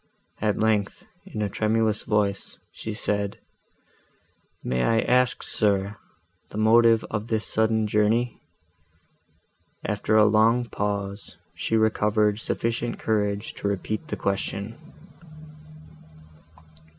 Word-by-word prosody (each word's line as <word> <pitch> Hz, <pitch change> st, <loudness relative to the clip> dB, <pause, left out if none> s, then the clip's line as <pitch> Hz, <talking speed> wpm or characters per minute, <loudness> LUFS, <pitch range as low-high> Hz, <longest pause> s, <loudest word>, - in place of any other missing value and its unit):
At 105 Hz, -1 st, +1 dB
length, 105 Hz, -2 st, 0 dB, 0.2 s
in 105 Hz, -, -3 dB
a -, -, 0 dB
tremulous 110 Hz, +1 st, +1 dB
voice, 105 Hz, -2 st, -1 dB
she 110 Hz, -1 st, -6 dB
said, 100 Hz, -2 st, -1 dB, 1.3 s
"May 60 Hz, 0 st, -1 dB
I 115 Hz, -, +3 dB
ask, 125 Hz, 0 st, +2 dB
sir, 100 Hz, 0 st, 0 dB, 0.5 s
the -, -, -8 dB
motive 115 Hz, +1 st, +5 dB
of 105 Hz, +1 st, -3 dB
this 110 Hz, -2 st, -1 dB
sudden 110 Hz, 0 st, +1 dB
journey?"—After 110 Hz, 0 st, -3 dB
a 105 Hz, -, +7 dB
long 110 Hz, +3 st, +4 dB
pause, 100 Hz, -2 st, -4 dB, 0.2 s
she 115 Hz, -, -1 dB
recovered 105 Hz, -1 st, +2 dB
sufficient 115 Hz, +1 st, -2 dB
courage 105 Hz, -1 st, -1 dB
to -, -, -4 dB
repeat 100 Hz, +2 st, -3 dB
the -, -, -4 dB
question. 100 Hz, +2 st, -2 dB
110 Hz, 100 wpm, -25 LUFS, 105-110 Hz, 1.3 s, a